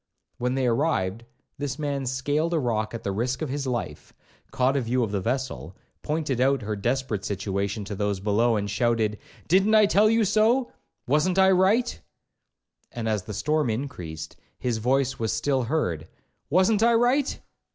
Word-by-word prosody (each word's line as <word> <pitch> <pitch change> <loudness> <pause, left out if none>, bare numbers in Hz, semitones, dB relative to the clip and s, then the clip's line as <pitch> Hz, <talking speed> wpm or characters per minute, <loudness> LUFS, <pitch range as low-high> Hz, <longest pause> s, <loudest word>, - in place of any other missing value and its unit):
When 125 +1 0
they 135 -1 0
arrived, 115 -5 0 0.3
this 145 -2 -3
man 140 -3 -2
scaled 145 +6 0
a - - +2
rock 110 -4 -1
at 115 - -7
the 100 - -1
risk 125 +8 -2
of 155 - -3
his 140 0 -3
life, 120 -2 -4 0.4
caught 130 +2 +1
a 140 - +2
view 125 +1 0
of 110 - -2
the 100 -2 -1
vessel, 125 - -3 0.2
pointed 150 -5 -1
out 135 -1 +2
her 105 0 -2
desperate 115 -1 -2
situation 100 +1 -2
to 105 - -5
those 100 -1 -1
below, 110 +4 +2
and 105 -1 -1
shouted, 110 -1 0 0.3
'Didn't 195 +6 +4
I 215 -1 +7
tell 205 +2 +4
you 225 0 +3
so? 220 +5 +2 0.3
wasn't 155 +7 +1
I 190 0 +6
right?' 195 +7 +2 0.9
And 115 -2 -4
as 110 -2 0
the 105 - -6
storm 150 +4 0
increased, 90 - -5 0.2
his 120 -3 -2
voice 135 +3 +1
was 110 -1 -1
still 135 -2 0
heard, 90 - -1 0.4
'wasn't 190 +6 +3
I 235 0 +5
right?' 250 +4 +2
130 Hz, 170 wpm, -25 LUFS, 110-155 Hz, 0.9 s, I